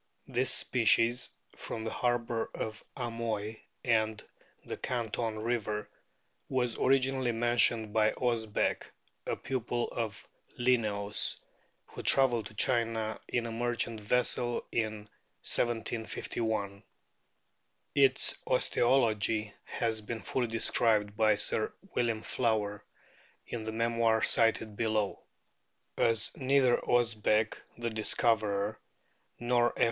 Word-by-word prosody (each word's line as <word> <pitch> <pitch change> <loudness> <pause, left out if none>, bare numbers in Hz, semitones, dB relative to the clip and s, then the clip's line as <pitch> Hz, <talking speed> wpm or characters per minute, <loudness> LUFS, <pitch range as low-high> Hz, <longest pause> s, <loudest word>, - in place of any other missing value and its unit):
This 130 +2 +1
species, 120 +1 +3 0.3
from 110 - -6
the 110 - -2
harbour 120 -2 -1
of 110 0 -5
Amoy 115 -3 -3 0.3
and 110 -2 +1 0.4
the - - -4
Canton 115 -2 -3
river, 110 -2 -2 0.6
was 125 -3 0
originally 130 -1 +2
mentioned 115 -2 +2
by 110 -1 +3
Osbeck, 115 -4 -1 0.4
a - - 0
pupil 120 -2 -2
of 110 -3 -5 0.3
Linnaeus, 105 -5 +1 0.5
who - - -9
travelled 120 -5 +5
to 110 - -15
China 115 -1 0
in 120 -1 -1
a 115 - -4
merchant 115 -1 -1
vessel 120 +2 0
in 110 -2 -1 0.5
1751. 110 -3 -1 1.1
Its 135 -2 +4
osteology 110 -4 +2
has 110 -2 -1
been 110 +1 -6
fully 125 -2 -1
described 110 -2 +1
by 110 -1 +4
Sir 110 +1 0 0.2
William 115 -2 0
Flower 105 -4 -1 0.6
in 115 -2 -5
the 110 - -3
memoir 115 0 +1
cited 115 -2 +2
below.* 110 -2 0 0.8
As 115 -2 +1
neither 130 -2 +3
Osbeck, 110 -2 +1 0.2
the 115 0 -3
discoverer, 110 -1 +1 0.6
nor 120 0 +1
F. - - -9
115 Hz, 105 wpm, -31 LUFS, 110-120 Hz, 1.1 s, travelled